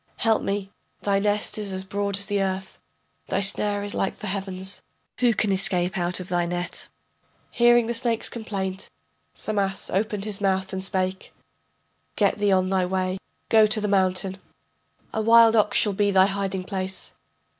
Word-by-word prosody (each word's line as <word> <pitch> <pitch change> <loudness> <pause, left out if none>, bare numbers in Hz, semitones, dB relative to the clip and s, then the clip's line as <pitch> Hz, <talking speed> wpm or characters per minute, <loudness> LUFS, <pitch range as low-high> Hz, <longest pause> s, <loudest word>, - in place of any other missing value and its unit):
Help 225 -1 +2
me, 200 0 -3 0.3
thy 200 -1 +2
nest 205 +1 0
is 205 -2 -4
as 190 0 -4
broad 200 +1 -1
as 200 - -1
the 200 0 0
earth, 190 0 -3 0.5
Thy 190 - 0
snare 200 +1 +1
is 205 - -5
like 195 - -2
the 215 - -8
heavens, 190 -1 -4 0.4
Who 240 -3 +3
can 205 0 +1
escape 190 -2 +2
out 175 0 +3
of 180 - -7
thy 175 -1 0
net? 175 +1 -3 0.6
Hearing 240 -1 +4
the 235 - -2
snake's 230 -1 0
complaint, 195 -4 -5 0.5
Samas 200 -2 -1
opened 210 +1 -1
his 205 -2 -4
mouth 190 -1 0
and 190 0 -1
spake: 185 0 -2 0.8
Get - - +1
thee 205 -1 +2
on 185 -1 +3
thy 190 -1 +2
way, 185 0 -1 0.3
go 220 -2 +6
to 215 +1 +1
the 210 - -1
mountain. 190 -1 0 0.7
A 220 - 0
wild 230 0 +6
ox 210 -1 +3
shall 205 - +2
be 205 +1 +1
thy 190 -1 +5
hiding 195 -1 -2
place. 190 -1 -4
195 Hz, 170 wpm, -24 LUFS, 190-210 Hz, 0.8 s, go